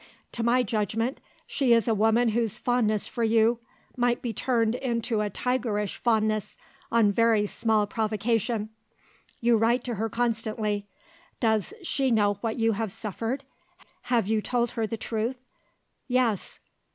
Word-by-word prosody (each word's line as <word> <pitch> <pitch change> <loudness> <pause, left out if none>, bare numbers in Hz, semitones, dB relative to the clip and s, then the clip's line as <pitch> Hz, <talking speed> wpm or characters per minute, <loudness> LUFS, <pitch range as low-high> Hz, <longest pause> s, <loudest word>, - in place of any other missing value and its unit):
To 235 - -4
my 240 +2 +3
judgment, 225 +3 -1 0.3
she 260 -4 +2
is 230 -1 +3
a 225 - +3
woman 225 +3 +3
whose 225 -1 0
fondness 220 -4 +1
for 235 - -3
you 225 +1 +3 0.4
might 245 -1 +1
be 235 -2 -2
turned 230 -3 +1
into 235 -3 -1
a 210 - -1
tigerish 220 -3 -1
fondness, 215 -3 0 0.3
on 225 -3 +4
very 225 0 +3
small 215 0 +1
provocation. 220 +1 -1 0.7
You 235 -1 +4
write 235 +3 +2
to 245 - -3
her 225 - 0
constantly. 220 -3 -1 0.5
Does 220 -4 +1
she 275 -5 0
know 205 -4 +2
what 225 -2 -2
you 225 -1 +2
have 220 -1 -2
suffered? 225 +7 -4 0.7
Have 235 -5 +3
you 220 0 +1
told 240 +1 0
her 225 -2 -2
the 225 - -4
truth?" 225 +3 -2 0.7
"Yes." 245 -6 0
225 Hz, 145 wpm, -27 LUFS, 215-240 Hz, 0.7 s, on